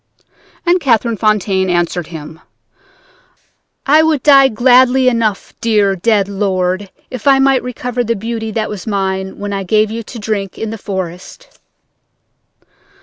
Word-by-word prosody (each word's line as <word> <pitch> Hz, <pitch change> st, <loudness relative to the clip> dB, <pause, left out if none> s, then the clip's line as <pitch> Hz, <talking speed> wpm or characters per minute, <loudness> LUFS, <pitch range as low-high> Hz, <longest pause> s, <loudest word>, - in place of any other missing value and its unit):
"And 350 Hz, +1 st, +3 dB
Catherine 235 Hz, -5 st, +1 dB
Fontaine 200 Hz, -3 st, +1 dB
answered 175 Hz, -1 st, -1 dB
him: 160 Hz, -1 st, -9 dB, 1.5 s
"'I 300 Hz, +3 st, +5 dB
would 315 Hz, -4 st, +1 dB
die 275 Hz, -2 st, +7 dB
gladly 255 Hz, +2 st, +4 dB
enough, 230 Hz, -5 st, 0 dB
dear, 210 Hz, -4 st, +2 dB
dead 200 Hz, +1 st, +1 dB
lord, 190 Hz, -1 st, -1 dB, 0.2 s
if 255 Hz, +1 st, -6 dB
I 275 Hz, -1 st, +6 dB
might 270 Hz, -1 st, +3 dB
recover 250 Hz, 0 st, -3 dB
the 230 Hz, 0 st, -1 dB
beauty 225 Hz, +2 st, -4 dB
that 215 Hz, 0 st, -2 dB
was 210 Hz, 0 st, -7 dB
mine 190 Hz, -2 st, -2 dB
when 205 Hz, 0 st, -5 dB
I 195 Hz, -, -2 dB
gave 215 Hz, +3 st, +1 dB
you 230 Hz, +1 st, -4 dB
to 230 Hz, +2 st, -10 dB
drink 205 Hz, -3 st, -4 dB
in 220 Hz, -1 st, -4 dB
the 225 Hz, -, -7 dB
forest.' 190 Hz, -, -7 dB
215 Hz, 145 wpm, -15 LUFS, 195-245 Hz, 1.5 s, die